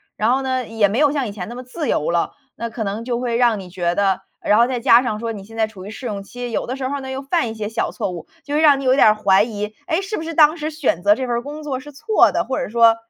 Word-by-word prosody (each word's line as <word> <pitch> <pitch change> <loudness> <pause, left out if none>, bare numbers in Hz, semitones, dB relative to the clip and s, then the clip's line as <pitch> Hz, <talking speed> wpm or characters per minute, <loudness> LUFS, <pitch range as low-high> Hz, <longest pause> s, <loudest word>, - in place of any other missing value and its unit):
然 220 +3 +1
后 265 - +2
呢， 260 -2 -1
也 225 -2 +2
没 205 - -2
有 295 -2 +4
像 275 -5 -1
以 - - -5
前 195 0 -6
那 240 - -7
么 250 - -6
自 285 +4 -4
由 150 - 0
了， 170 0 0 0.2
那 235 - -4
可 225 0 -4
能 205 +3 -3
就 240 -1 -2
会 240 -2 -1
让 235 -3 +3
你 185 - -9
觉 175 -1 -1
得 195 -2 +1 0.2
然 210 - +3
后 235 - +6
再 250 -1 -2
加 240 0 +6
上 215 -3 -2
说 230 0 -3
你 200 -2 -8
现 225 +2 -13
在 220 -1 +2
处 190 -4 -11
于 205 - -7
试 245 +3 -9
用 200 -3 -4
期， 245 +3 -7
有 - - -1
的 255 - -4
时 260 -1 -2
候 285 - -2
儿 280 - -4
呢， 265 0 -6
又 265 +1 -4
犯 280 -3 0
一 - - -5
些 215 -2 -4
小 225 +1 -2
错 - - -3
误， 170 -2 -8 0.2
就 290 +1 -3
会 310 - +2
让 290 -3 +6
你 275 - -5
有 255 +1 +4
点 250 - +6
儿 215 - +5
怀 200 -1 +4
疑， 210 -2 -5
诶， 325 +4 +1
是 410 +2 -4
不 320 - -4
是 330 0 -5
当 310 +1 +5
时 310 -1 -4
选 280 - -1
择 205 - +6
这 260 0 -3
份 240 - 0
儿 235 - -1
工 295 +4 -8
作 270 -4 -3
是 295 - -11
错 410 +10 +3
的？ - - 0
或 265 - -2
者 - - -2
说， 230 0 +5
235 Hz, 355 characters per minute, -20 LUFS, 210-270 Hz, 0.2 s, 后